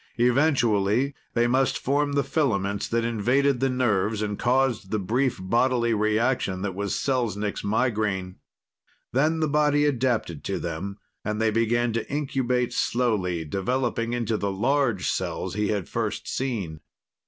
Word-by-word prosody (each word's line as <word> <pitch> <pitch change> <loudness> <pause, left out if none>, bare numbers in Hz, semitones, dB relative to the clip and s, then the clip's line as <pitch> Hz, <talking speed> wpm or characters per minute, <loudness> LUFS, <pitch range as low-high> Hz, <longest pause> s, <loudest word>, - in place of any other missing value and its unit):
Eventually, 120 -2 +2 0.2
they 120 0 +3
must 130 +2 +2
form 145 +2 0
the 140 0 +2
filaments 100 -11 0
that 115 0 0
invaded 125 +4 +2
the 135 +1 +2
nerves 110 -4 +1
and 105 -1 -3
caused 125 -5 +1
the 110 - 0
brief 120 +7 0
bodily 120 +4 +2
reaction 110 -2 +1
that 100 -2 -2
was 100 +1 -2
Selznik's 110 -6 -1
migraine. 105 -4 0 0.8
Then 155 +5 +2
the 155 - +2
body 145 0 +3
adapted 120 - 0
to - - -1
them 85 +4 -4 0.3
and 105 0 -2
they 110 -1 +2
began 115 +1 +1
to 115 +1 -3
incubate 130 -4 0
slowly, 100 -9 0
developing 115 - -1
into 115 -2 0
the 100 -1 -1
large 120 0 +1
cells 90 0 -2
he 105 +1 0
had 100 -4 -1
first - - -3
seen. 105 - -3
115 Hz, 140 wpm, -25 LUFS, 100-130 Hz, 0.8 s, they